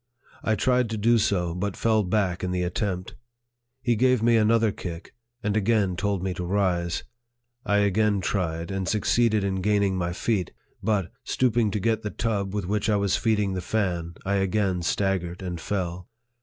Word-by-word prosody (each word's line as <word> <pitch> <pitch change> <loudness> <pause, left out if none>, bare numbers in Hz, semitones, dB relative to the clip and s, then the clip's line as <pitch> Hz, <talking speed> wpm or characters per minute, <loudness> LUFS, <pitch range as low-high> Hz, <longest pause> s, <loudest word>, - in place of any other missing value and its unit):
I 110 - +1
tried 125 +3 +2
to 110 - -3
do 115 +2 +4
so, 90 -5 +1
but 95 +2 -3
fell 110 -1 +3
back 95 -2 0
in 90 - -1
the 90 0 -1
attempt. 90 0 -2 0.7
He 120 -2 +2
gave 125 0 +3
me 120 0 +4
another 110 0 +3
kick, 85 -3 -7 0.3
and 105 0 0
again 105 -3 +2
told 100 0 -1
me 95 -1 -1
to 90 0 -5
rise. 90 -2 0 0.6
I 105 - +3
again 105 +1 +2
tried, 85 -2 -2
and 95 -1 -2
succeeded 110 0 +2
in 95 -1 -1
gaining 100 -1 +2
my 85 -1 -1
feet; 95 0 -1 0.3
but, 100 -4 0
stooping 120 -3 +1
to 105 - -2
get 110 +2 +1
the 105 - -3
tub 100 -3 -2
with 100 -3 -2
which 105 +3 0
I 105 - +3
was 100 -1 +1
feeding 105 -4 +1
the 90 - -2
fan, 90 -4 -1
I 100 +1 +1
again 95 -2 +1
staggered 90 0 -1
and 90 -2 -4
fell. 90 -2 -3
100 Hz, 180 wpm, -25 LUFS, 90-110 Hz, 0.7 s, do